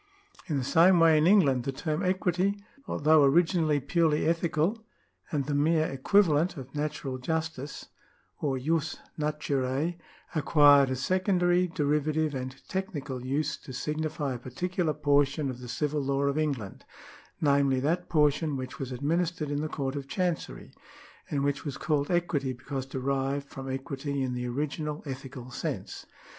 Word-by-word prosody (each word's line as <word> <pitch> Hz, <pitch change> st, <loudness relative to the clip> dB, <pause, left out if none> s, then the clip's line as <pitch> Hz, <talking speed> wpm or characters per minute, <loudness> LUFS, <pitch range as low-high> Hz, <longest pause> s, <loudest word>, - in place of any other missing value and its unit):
In 150 Hz, -5 st, 0 dB
the 135 Hz, -, -1 dB
same 175 Hz, +6 st, +5 dB
way 165 Hz, -1 st, +6 dB
in 155 Hz, -, +3 dB
England, 145 Hz, -11 st, +4 dB
the 135 Hz, -, -2 dB
term 155 Hz, +4 st, -2 dB
equity, 185 Hz, +1 st, +1 dB, 0.3 s
although 155 Hz, 0 st, +4 dB
originally 160 Hz, +1 st, +3 dB
purely 155 Hz, +2 st, +1 dB
ethical 170 Hz, +5 st, 0 dB, 0.5 s
and 145 Hz, -3 st, 0 dB
the 145 Hz, -, -2 dB
mere 155 Hz, +2 st, +3 dB
equivalent 160 Hz, +3 st, +2 dB
of 135 Hz, -1 st, -9 dB
natural 145 Hz, -3 st, -3 dB
justice 160 Hz, 0 st, -3 dB, 0.5 s
or 135 Hz, -3 st, 0 dB
jus 155 Hz, +3 st, -1 dB, 0.2 s
naturae, 150 Hz, +1 st, -1 dB, 0.3 s
acquired 145 Hz, -3 st, +5 dB
a 130 Hz, -, -1 dB
secondary, 180 Hz, +3 st, +2 dB
derivative, 150 Hz, 0 st, 0 dB
and 130 Hz, 0 st, -6 dB
technical 145 Hz, -9 st, -4 dB
use 145 Hz, +4 st, -1 dB
to 130 Hz, -, -11 dB
signify 150 Hz, 0 st, -2 dB
a 120 Hz, -, -6 dB
])articular 165 Hz, +6 st, -2 dB
portion 145 Hz, -1 st, +2 dB
of 125 Hz, -, -9 dB
the 125 Hz, -, -8 dB
civil 150 Hz, +4 st, -1 dB
law 140 Hz, 0 st, 0 dB
of 140 Hz, 0 st, +1 dB
England, 140 Hz, -11 st, -2 dB, 0.6 s
namely, 140 Hz, -3 st, +3 dB
that 165 Hz, +7 st, -1 dB
portion 150 Hz, -1 st, +2 dB
which 130 Hz, +3 st, -6 dB
was 135 Hz, -2 st, -4 dB
administered 155 Hz, +3 st, -1 dB
in 145 Hz, 0 st, -1 dB
the 155 Hz, -, -3 dB
Court 135 Hz, -2 st, -3 dB
of 140 Hz, -1 st, -5 dB
Chancery, 175 Hz, +2 st, -3 dB, 0.6 s
and 140 Hz, -2 st, -1 dB
which 140 Hz, 0 st, -1 dB
was 145 Hz, -3 st, -4 dB
called 145 Hz, -3 st, 0 dB
equity 170 Hz, -7 st, 0 dB
because 130 Hz, +1 st, -5 dB
derived 135 Hz, +1 st, -2 dB
from 135 Hz, -1 st, -7 dB
equity 135 Hz, +1 st, -3 dB
in 130 Hz, -1 st, -2 dB
the 125 Hz, 0 st, -3 dB
original 150 Hz, +4 st, -3 dB
ethical 130 Hz, -2 st, -7 dB
sense. -, -, -5 dB
145 Hz, 150 wpm, -28 LUFS, 135-160 Hz, 0.6 s, way